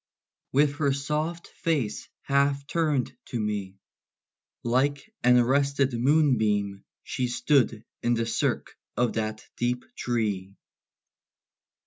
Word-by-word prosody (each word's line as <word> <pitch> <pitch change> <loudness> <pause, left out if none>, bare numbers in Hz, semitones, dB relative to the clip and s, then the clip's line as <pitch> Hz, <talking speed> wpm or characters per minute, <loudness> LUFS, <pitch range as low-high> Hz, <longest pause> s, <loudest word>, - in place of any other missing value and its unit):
With 145 +1 +3
her 140 -3 +2
soft 150 +5 -2
face 145 -10 -2
half 140 0 +2
turned 150 -5 0
to 120 - -4
me, 105 -3 -2 0.9
Like 140 - 0
an 125 0 +6
arrested 135 +2 +2
moonbeam, 115 -7 +2 0.2
she 125 - -2
Stood 125 -3 +2 0.2
in 120 0 +2
the 115 0 0
cirque 115 - -1 0.2
of 125 -1 +2
that 110 -1 -3
deep 125 +1 -1
tree. 105 -5 -2
125 Hz, 105 wpm, -27 LUFS, 110-140 Hz, 0.9 s, an